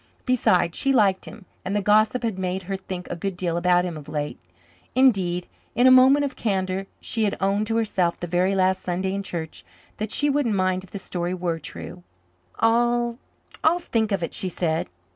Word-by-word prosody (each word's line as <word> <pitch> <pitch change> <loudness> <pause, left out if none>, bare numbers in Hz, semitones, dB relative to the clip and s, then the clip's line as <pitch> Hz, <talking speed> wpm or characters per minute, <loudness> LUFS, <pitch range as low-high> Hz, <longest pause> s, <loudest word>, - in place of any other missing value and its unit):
Besides, 185 -9 +2
she 275 - +2
liked 200 -7 +3
him, 185 - -11 0.2
and 190 +2 -3
the 205 - +1
gossip 215 +4 +3
had 220 -5 -2
made 185 0 -2
her 195 +2 -3
think 185 -1 -7
a - - -2
good 190 +1 -4
deal 175 -2 -1
about 180 +1 +3
him 175 -2 -4
of 150 0 -11
late. 150 -1 -4 0.6
Indeed, 190 -9 +3 0.3
in 245 - +3
a 260 - +8
moment 265 +3 +6
of 275 - -5
candour 190 -2 -1
she 225 - -2
had 205 - -1
owned 200 +2 +1
to 225 - -1
herself 195 -6 0
the - - -4
very 180 +3 +1
last 185 0 +2
Sunday 185 +2 -2
in 200 - -2
church 160 - -6 0.3
that 215 0 -4
she 290 - +2
wouldn't 275 -7 +1
mind 185 -1 0
if 190 - -15
the - - -6
story 180 -1 -3
were 170 -2 -2
true. 85 - -8 0.6
"I'll 240 +1 +2 0.4
I'll 325 +2 +4
think 225 -11 -1
of 195 -3 0
it," - - -4
she 185 - -2
said. 160 - -1
190 Hz, 200 wpm, -24 LUFS, 180-225 Hz, 0.6 s, a